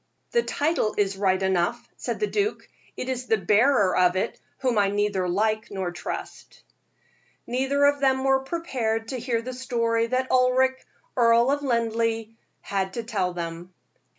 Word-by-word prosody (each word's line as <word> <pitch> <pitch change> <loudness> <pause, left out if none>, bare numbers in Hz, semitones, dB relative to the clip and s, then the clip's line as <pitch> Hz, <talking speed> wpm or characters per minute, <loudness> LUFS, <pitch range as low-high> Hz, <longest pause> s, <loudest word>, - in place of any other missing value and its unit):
"The 475 - +3
title 295 - 0
is 195 -1 +1
right 190 -1 +1
enough," 185 -2 0
said - - -4
the 420 - +2
duke; 415 0 -2 0.3
"it 255 - -4
is 255 -1 -3
the 220 - +3
bearer 210 +2 +3
of 180 0 +3
it 190 +5 -2 0.2
whom 250 -5 +1
I 200 -1 +3
neither 205 -3 0
like 215 +4 0
nor 190 -3 -3
trust." 175 - -7 0.8
Neither 270 +3 +1
of 285 0 +3
them 265 -1 +2
were 270 0 +3
prepared 255 -7 -2
to 260 - -3
hear 235 -1 -1
the 255 +2 -5
story 230 -3 0
that 255 +2 -1
Ulric, 260 +1 +3 0.3
Earl 235 +1 +4
of 285 0 0
Linleigh, 230 -3 0 0.3
had 190 -1 -2
to 235 - -4
tell 195 -6 -1
them. 170 +1 -6
230 Hz, 160 wpm, -25 LUFS, 200-260 Hz, 0.8 s, Earl